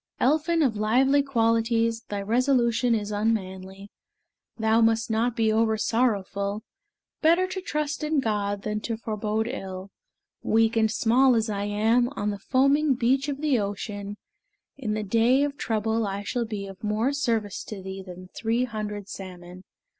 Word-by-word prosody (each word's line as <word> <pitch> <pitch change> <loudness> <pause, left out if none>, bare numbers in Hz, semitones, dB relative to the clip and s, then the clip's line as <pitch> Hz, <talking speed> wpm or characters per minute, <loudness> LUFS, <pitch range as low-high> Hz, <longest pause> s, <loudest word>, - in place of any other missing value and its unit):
Elphin 315 +4 +2
of 245 -6 +1
lively 255 +7 +3
qualities, 230 -3 +1
Thy 200 -1 -3
resolution 240 +1 +2
is 210 -1 -3
unmanly: 195 -2 -3 0.7
Thou 220 0 +3
must 225 0 +2
not 230 +2 +1
be 225 -2 +2
oversorrowful: 215 -2 0 0.6
Better 335 +3 +4
to 370 +1 -5
trust 300 -3 -3
in 305 -1 +1
God 205 -4 -1
than 210 0 -2
to 225 +1 -3
forebode 220 0 -2
ill. 190 -3 -6 0.5
Weak 225 +1 +2
and 220 -1 +3
small 245 +4 +3
as 220 -1 0
I 200 0 -2
am, 225 +4 +2
On 205 +1 -1
the 200 - -6
foaming 275 +5 +2
beach 265 +4 +1
of 280 0 -4
the 290 -6 +2
ocean, 205 0 -4 0.6
In 220 -6 -3
the 215 - -2
day 230 +6 +3
of 290 -1 -2
trouble 220 -2 -1
I 200 +1 -4
shall 240 +3 -2
be 210 -3 -5
Of 195 0 -11
more 215 +6 0
service 225 -8 -1
to 200 -3 -8
thee 190 0 -6
than 185 0 -11
three 230 +2 0
hundred 210 -4 -5
salmon. 180 -2 -9
225 Hz, 155 wpm, -26 LUFS, 205-250 Hz, 0.7 s, Better